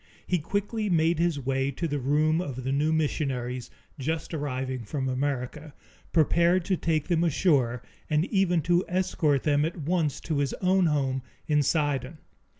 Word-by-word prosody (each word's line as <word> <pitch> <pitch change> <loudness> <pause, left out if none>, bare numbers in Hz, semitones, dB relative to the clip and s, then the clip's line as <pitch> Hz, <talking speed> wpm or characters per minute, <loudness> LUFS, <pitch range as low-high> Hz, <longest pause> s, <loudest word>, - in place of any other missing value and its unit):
He 180 - +1
quickly 205 +6 -2
made 165 -1 +2
his 170 -4 +1
way 135 0 0
to 155 +5 -3
the 145 -2 -2
room 155 +5 +2
of 130 -7 -5
the 130 - -1
new 145 +3 +1
missionaries, 130 -5 -1 0.3
just 160 +5 -3
arriving 130 -4 -3
from 130 +5 -3
America, 140 +2 -3 0.4
prepared 170 +2 +3
to 190 - +1
take 160 -3 -1
them 170 -2 +2
ashore, 135 -8 +2 0.3
and 155 +1 +2
even 185 -6 +1
to 175 +3 +3
escort 175 -6 +1
them 145 -1 +2
at 165 +3 -2
once 160 -1 0
to 155 -3 -2
his 140 -2 0
own 185 -1 +2
home 135 -3 0 0.2
in 150 -1 +2
Sidon. 145 -1 0
150 Hz, 160 wpm, -27 LUFS, 135-170 Hz, 0.4 s, prepared